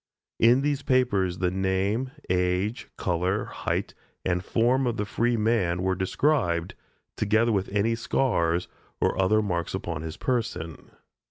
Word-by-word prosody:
In 120 Hz, +3 st, +5 dB
these 145 Hz, 0 st, 0 dB
papers 100 Hz, -10 st, +1 dB
the 90 Hz, 0 st, 0 dB
name, 95 Hz, +6 st, 0 dB, 0.2 s
age, 90 Hz, +4 st, 0 dB
color, 90 Hz, +3 st, 0 dB
height, -, -, -3 dB, 0.3 s
and 90 Hz, -1 st, 0 dB
form 125 Hz, +5 st, +2 dB
of 120 Hz, -1 st, -1 dB
the 105 Hz, -, -1 dB
free 120 Hz, +4 st, 0 dB
man 100 Hz, -6 st, +1 dB
were 95 Hz, 0 st, +2 dB
described, 95 Hz, -, 0 dB, 0.4 s
together 110 Hz, +2 st, +2 dB
with 100 Hz, -3 st, 0 dB
any 105 Hz, +3 st, +1 dB
scars 90 Hz, -8 st, 0 dB, 0.3 s
or -, -, +1 dB
other 110 Hz, +3 st, +3 dB
marks 85 Hz, -5 st, -2 dB
upon 85 Hz, -3 st, -4 dB
his 80 Hz, +1 st, -6 dB
person. 115 Hz, -10 st, -3 dB
100 Hz, 140 wpm, -26 LUFS, 90-115 Hz, 0.4 s, In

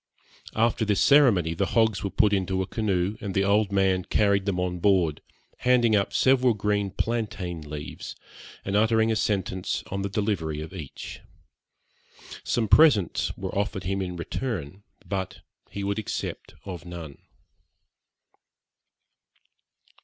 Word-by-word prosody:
After 115 Hz, +1 st, +2 dB
this 105 Hz, -2 st, +1 dB
ceremony 115 Hz, -, +5 dB
the 95 Hz, +4 st, -1 dB
hogs 110 Hz, -3 st, +3 dB
were 100 Hz, -, -1 dB
put 105 Hz, +1 st, +3 dB
into 95 Hz, -1 st, 0 dB
a -, -, -5 dB
canoe 100 Hz, -1 st, -1 dB
and 100 Hz, -2 st, -4 dB
the 95 Hz, -, +3 dB
old 100 Hz, +1 st, +2 dB
man 95 Hz, -2 st, +2 dB
carried 100 Hz, +1 st, +1 dB
them 95 Hz, -3 st, 0 dB
on 90 Hz, -1 st, -2 dB
board, 90 Hz, -5 st, +2 dB, 0.4 s
handing 120 Hz, -3 st, +3 dB
up 100 Hz, -1 st, +1 dB
several 130 Hz, -3 st, +3 dB
green 105 Hz, -1 st, 0 dB
plantain 100 Hz, -5 st, -3 dB
leaves, 75 Hz, -1 st, -7 dB, 0.5 s
and 100 Hz, -, -2 dB
uttering 110 Hz, +1 st, +3 dB
a -, -, +1 dB
sentence 95 Hz, -4 st, -1 dB
on 100 Hz, +1 st, -2 dB
the 100 Hz, -, -2 dB
delivery 95 Hz, -7 st, -1 dB
of 80 Hz, +3 st, -7 dB
each. 80 Hz, -8 st, -8 dB, 1.2 s
Some 115 Hz, -2 st, 0 dB
presents 105 Hz, -, +4 dB
were -, -, -5 dB
offered 100 Hz, -1 st, -2 dB
him 95 Hz, +2 st, -1 dB
in 90 Hz, -1 st, -4 dB
return, 95 Hz, -, -4 dB, 0.2 s
but 95 Hz, 0 st, -4 dB, 0.3 s
he 100 Hz, -, -5 dB
would 100 Hz, +1 st, -1 dB
accept 110 Hz, -, -5 dB
of 90 Hz, -4 st, -7 dB
none. 85 Hz, -5 st, -9 dB
100 Hz, 140 wpm, -26 LUFS, 90-110 Hz, 1.2 s, ceremony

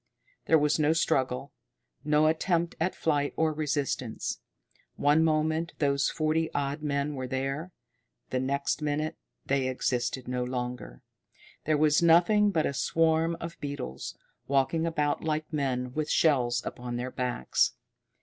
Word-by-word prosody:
There 160 Hz, -, +5 dB
was 150 Hz, +1 st, +2 dB
no 155 Hz, +1 st, +3 dB
struggle, 135 Hz, -4 st, 0 dB, 0.5 s
no 150 Hz, +1 st, +3 dB
attempt 165 Hz, +2 st, +1 dB
at 175 Hz, +3 st, 0 dB
flight 145 Hz, -3 st, 0 dB
or 160 Hz, -1 st, +1 dB
resistance. 145 Hz, -6 st, -2 dB, 0.6 s
One 145 Hz, +3 st, +3 dB
moment 160 Hz, +1 st, +1 dB
those 140 Hz, -1 st, +2 dB
forty 160 Hz, +1 st, 0 dB
odd 145 Hz, +1 st, -1 dB
men 145 Hz, 0 st, -1 dB
were 130 Hz, -2 st, -4 dB
there 135 Hz, +7 st, -3 dB, 0.6 s
the 130 Hz, -, 0 dB
next 140 Hz, +3 st, -1 dB
minute 150 Hz, +1 st, -1 dB, 0.3 s
they 135 Hz, -1 st, +1 dB
existed 125 Hz, 0 st, -1 dB
no 125 Hz, 0 st, -1 dB
longer. 125 Hz, -, -5 dB, 0.6 s
There 155 Hz, 0 st, +2 dB
was 150 Hz, +1 st, +4 dB
nothing 175 Hz, +5 st, +5 dB
but 165 Hz, -6 st, +1 dB
a -, -, -1 dB
swarm 165 Hz, +2 st, +1 dB
of 165 Hz, 0 st, -7 dB
beetles, 140 Hz, -, -5 dB, 0.3 s
walking 140 Hz, +4 st, +1 dB
about 150 Hz, -3 st, 0 dB
like 155 Hz, 0 st, -2 dB
men 125 Hz, -4 st, -1 dB
with 155 Hz, +1 st, -2 dB
shells 125 Hz, -6 st, +2 dB
upon 120 Hz, 0 st, -5 dB
their 125 Hz, +1 st, -3 dB
backs. 125 Hz, -, 0 dB
145 Hz, 140 wpm, -28 LUFS, 130-160 Hz, 0.6 s, There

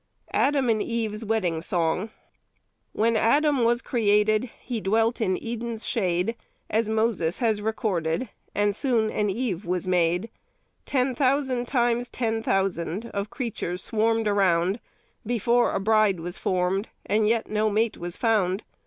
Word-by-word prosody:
ADAM 275 Hz, -2 st, +2 dB
AND 220 Hz, -2 st, +2 dB
EVE'S 225 Hz, -2 st, -2 dB
WEDDING 195 Hz, -7 st, 0 dB
SONG. 175 Hz, +4 st, 0 dB, 0.8 s
When 230 Hz, +1 st, +1 dB
Adam 280 Hz, +4 st, +3 dB
was 240 Hz, +1 st, +2 dB
created, 215 Hz, 0 st, +2 dB
he 235 Hz, -4 st, -4 dB
dwelt 225 Hz, +4 st, +1 dB
in 185 Hz, -4 st, +1 dB
Eden's 235 Hz, -1 st, -4 dB
shade, 185 Hz, +1 st, 0 dB, 0.4 s
As 220 Hz, 0 st, +1 dB
Moses 220 Hz, -6 st, +1 dB
has 220 Hz, -4 st, +1 dB
recorded, 205 Hz, -2 st, -1 dB, 0.3 s
and 205 Hz, 0 st, +2 dB
soon 225 Hz, -3 st, +1 dB
an 210 Hz, -1 st, 0 dB
Eve 200 Hz, -3 st, -2 dB
was 180 Hz, -1 st, -2 dB
made. 180 Hz, +3 st, +1 dB, 0.6 s
Ten 260 Hz, -1 st, +1 dB
thousand 260 Hz, -1 st, +1 dB
times 240 Hz, -1 st, +1 dB
ten 225 Hz, -2 st, -1 dB
thousand 195 Hz, -1 st, -1 dB
Of 200 Hz, +1 st, -3 dB
creatures 205 Hz, -8 st, -4 dB
swarmed 225 Hz, 0 st, +1 dB
around 190 Hz, 0 st, +2 dB, 0.4 s
Before 240 Hz, +1 st, +2 dB
a -, -, -1 dB
bride 215 Hz, -2 st, +3 dB
was 175 Hz, +2 st, -5 dB
formed, 185 Hz, +3 st, 0 dB, 0.2 s
And 210 Hz, +1 st, +2 dB
yet 225 Hz, 0 st, +1 dB
no 215 Hz, 0 st, +1 dB
mate 220 Hz, +1 st, +1 dB
was 175 Hz, 0 st, -5 dB
found. 210 Hz, -4 st, +1 dB
215 Hz, 140 wpm, -25 LUFS, 190-235 Hz, 0.8 s, Adam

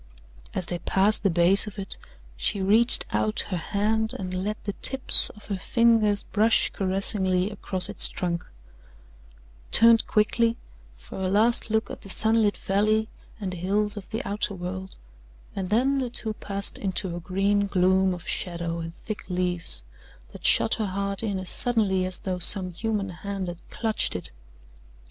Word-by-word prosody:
As 185 Hz, -, 0 dB
they 175 Hz, 0 st, -4 dB
passed 200 Hz, +5 st, +1 dB
the 200 Hz, -, +1 dB
base 180 Hz, +4 st, +5 dB
of 210 Hz, -, -9 dB
it, 195 Hz, -1 st, -6 dB, 0.4 s
she -, -, -2 dB
reached 220 Hz, +5 st, +4 dB
out 215 Hz, 0 st, 0 dB
her 185 Hz, -, -2 dB
hand 220 Hz, +6 st, -1 dB
and 185 Hz, -3 st, -6 dB
let 200 Hz, +4 st, -4 dB
the 200 Hz, -, -4 dB
tips 265 Hz, 0 st, +7 dB
of 210 Hz, -, -15 dB
her 200 Hz, -2 st, -4 dB
fingers 225 Hz, -2 st, +2 dB
brush 220 Hz, +2 st, +1 dB
caressingly 190 Hz, 0 st, 0 dB
across 190 Hz, -2 st, +2 dB
its -, -, +1 dB
trunk, 170 Hz, -1 st, -3 dB, 1.3 s
turned 230 Hz, 0 st, +5 dB
quickly 230 Hz, +2 st, +1 dB, 0.4 s
for -, -, -11 dB
a 185 Hz, -, -1 dB
last 225 Hz, +4 st, +2 dB
look 220 Hz, +1 st, -1 dB
at -, -, -9 dB
the 195 Hz, -, -13 dB
sunlit 220 Hz, +1 st, +1 dB
valley 215 Hz, +3 st, 0 dB, 0.3 s
and 190 Hz, -3 st, -5 dB
the -, -, -7 dB
hills 205 Hz, +4 st, -1 dB
of 205 Hz, -2 st, -9 dB
the 225 Hz, -, -5 dB
outer 205 Hz, 0 st, -1 dB
world 190 Hz, +1 st, -7 dB, 0.6 s
and 190 Hz, -2 st, -4 dB
then 265 Hz, +6 st, +1 dB
the 255 Hz, -2 st, -3 dB
two 220 Hz, -2 st, -4 dB
passed 200 Hz, -1 st, -5 dB
into 190 Hz, -2 st, -2 dB
a -, -, -5 dB
green 200 Hz, +3 st, 0 dB
gloom 190 Hz, -1 st, +2 dB
of 175 Hz, -, -12 dB
shadow 170 Hz, -1 st, -2 dB
and 165 Hz, 0 st, -7 dB
thick 215 Hz, +1 st, -8 dB
leaves 175 Hz, -, -1 dB, 0.5 s
that -, -, -13 dB
shut 115 Hz, -, +4 dB
her 215 Hz, -, -2 dB
heart 200 Hz, +1 st, -2 dB
in 205 Hz, -4 st, -2 dB
as 185 Hz, -1 st, +1 dB
suddenly 200 Hz, -6 st, +1 dB
as 185 Hz, -, -1 dB
though 185 Hz, -2 st, -5 dB
some 185 Hz, 0 st, +3 dB
human 210 Hz, +1 st, -3 dB
hand 195 Hz, +2 st, -6 dB
had 175 Hz, -1 st, -8 dB
clutched 225 Hz, -2 st, -1 dB
it. -, -, -2 dB
200 Hz, 165 wpm, -25 LUFS, 185-215 Hz, 1.3 s, tips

